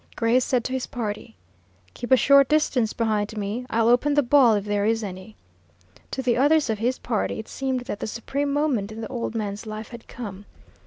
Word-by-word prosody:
Gray 230 +2 +3
said 250 -1 0
to 255 - -4
his 260 -1 -2
party, 220 -6 -5 0.6
"Keep 240 - -7
a 260 - +8
short 280 0 +5
distance 270 -7 +2
behind 215 -2 -1
me. 210 +5 -3
I'll 225 0 +2
open 250 +5 +3
the 290 - +4
ball, 245 -3 +5
if 205 -1 -2
there 205 -1 0
is 225 +1 +1
any." 190 +2 -8 0.7
To 265 - -4
the 245 -2 +2
others 290 -1 +3
of 215 - -3
his 245 +3 0
party, 225 -4 -2
it 220 - -7
seemed 265 -2 -2
that 245 -5 -6
the - - -4
supreme 280 +6 -3
moment 280 -8 0
in 220 +1 -7
the 220 - -4
old 235 -2 -4
man's 210 0 -4
life 215 0 -6
had 235 -2 -11
come. 205 -4 -8
230 Hz, 210 wpm, -24 LUFS, 215-260 Hz, 0.7 s, a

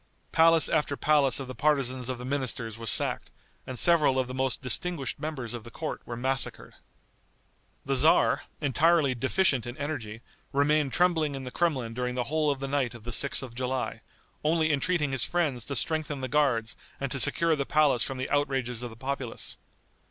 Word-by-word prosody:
Palace 165 0 +5
after 150 -3 0
palace 145 -4 +3
of 135 - -6
the 130 - -6
partisans 130 -4 0
of 130 - -3
the 125 - -8
ministers 130 -5 -2
was 115 -1 -2
sacked, - - +1 0.4
and 130 - -5
several 155 -5 +4
of 130 -1 0
the 130 - -7
most 130 0 -1
distinguished 140 +1 +1
members 135 -7 -5
of 120 -2 -6
the 120 - -10
court 155 +6 -5
were 120 - -5
massacred. 135 +2 -2 1.1
The 135 - 0
tzar, 140 +5 +3 0.2
entirely 150 0 +3
deficient 130 +1 +1
in 120 +3 -7
energy, 120 -7 -5 0.3
remained 145 0 +2
trembling 160 -4 +2
in 135 - -6
the 125 - -7
Kremlin 130 -10 -1
during 125 +1 -3
the 125 - 0
whole 155 -1 +2
of 140 -2 -1
the 135 - -4
night 135 -4 -1
of 115 - -12
the 120 - -5
6th 140 +2 +2
of 125 -3 -8
July, 130 +1 -3 0.4
only 155 0 +2
entreating 150 0 0
his 135 -3 0
friends 150 -10 -1
to 140 - -4
strengthen 150 +1 -1
the 130 - -2
guards 130 -6 +1 0.2
and 140 -1 -3
to 135 - 0
secure 165 +4 +4
the 140 -2 -3
palace 150 -6 +3
from 135 - -1
the 130 - -3
outrages 135 -5 -1
of 120 - -4
the 110 - -12
populace. 130 -1 -4
135 Hz, 190 wpm, -28 LUFS, 125-150 Hz, 1.1 s, Palace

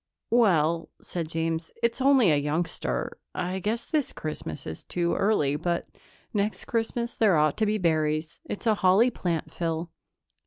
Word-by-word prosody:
"Well," 170 -8 +3
said 170 -3 -4
James, 165 0 -2
"it's 235 +2 +1
only 265 - +5
a - - +4
youngster. 155 +4 -2 0.2
I 185 +1 -2
guess 225 +5 -2
this 300 -4 -1
Christmas 150 - -5
is 80 - -6
too 170 -1 -1
early, 175 -9 +2
but 170 +2 -1 0.5
next 210 0 0
Christmas 235 +1 -1
there 205 -7 +4
ought 150 -1 +3
to 220 - +2
be 215 +1 +1
berries. 155 -3 0
It's 205 - -6
a 220 - +5
holly 205 +5 +4
plant, 170 -7 -2
Phyl." 165 0 -3
175 Hz, 155 wpm, -27 LUFS, 160-220 Hz, 0.5 s, only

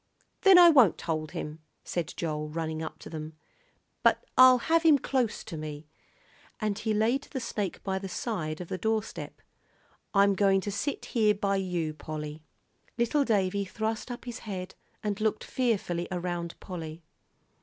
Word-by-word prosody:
"Then 390 -2 +8
I 350 -1 +10
won't 255 - +5
hold 155 -2 -3
him," 150 +1 -5 0.2
said 175 -2 -3
Joel, 150 -2 -2
running 160 0 -3
up 155 -1 -6
to - - -9
them, 155 -1 -6 0.7
"but - - +3
I'll 255 0 +9
have 325 +7 +2
him 320 -3 +6
close 255 -4 -1
to 165 - -7
me," 150 0 -6 0.7
and 215 -1 -1
he 220 0 -1
laid 225 +5 +2
the 265 - -5
snake 210 -6 -3
by 190 -1 -1
the 195 0 -6
side 170 -9 -3
of 175 - -6
the 185 - -4
doorstep. 220 0 -3 0.7
"I'm 200 0 +5
going 195 0 +3
to 205 - -3
sit 205 +8 -3
here 215 -3 +4
by 200 0 0
you, 175 -5 -2
Polly." 150 0 -6 0.6
Little 240 +5 +2
Davie 200 -4 +1
thrust 220 +4 -3
up 245 0 -7
his 240 -2 -6
head 190 -3 -6 0.3
and 210 0 -2
looked 215 0 0
fearfully 200 -9 -1
around 175 -1 -3
Polly. 165 -3 -7
195 Hz, 165 wpm, -29 LUFS, 165-225 Hz, 0.7 s, I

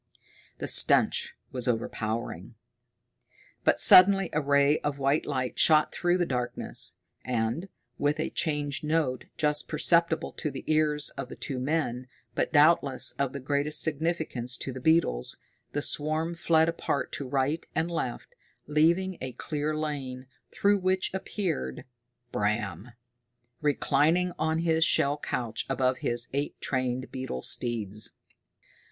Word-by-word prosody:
The - - -5
stench - - +4 0.2
was 125 -1 -1
overpowering. 115 -1 -3 1.1
But - - +3
suddenly 195 0 +7
a 150 - +1
ray 140 +1 +3
of 145 -1 -3
white 140 +2 0
light 130 -3 -3
shot 155 -1 +5
through 175 0 +1
the 175 - +1
darkness, 125 -5 -2 0.3
and, 125 +9 -2 0.3
with 145 +2 0
a 155 - -2
changed 145 -4 -2
note, 150 -4 -1
just 150 -1 +1
perceptible 165 +1 +1
to 155 - -4
the 135 -1 -8
ears 150 -1 +1
of 135 -2 -7
the - - -8
two 130 -2 -4
men, 130 -3 -2 0.3
but - - -1
doubtless 145 -3 +4
of 140 -2 0
the 140 - -6
greatest 145 +3 +1
significance 155 -6 -1
to 135 - -5
the 130 - -8
beetles, 160 - +1 0.3
the 145 - -2
swarm 155 +3 0
fled 165 -1 +2
apart 165 -4 -2
to 140 - -4
right 140 +4 0
and 165 +2 -1
left, 145 -8 -4 0.3
leaving 170 +5 +1
a 130 -1 -5
clear 150 +3 -3
lane, 135 -4 -4 0.3
through 200 0 +2
which 185 0 0
appeared 180 - -3 0.5
Bram, 105 +2 -2 0.7
reclining 150 +4 +2
on 160 +1 0
his 160 -1 +2
shell 145 -2 +2
couch 115 -6 -4
above 130 -1 0
his 120 0 -2
eight 140 +1 -3
trained 130 -1 -2
beetle 130 - -5
steeds! 110 -3 +1
145 Hz, 135 wpm, -27 LUFS, 130-160 Hz, 1.1 s, suddenly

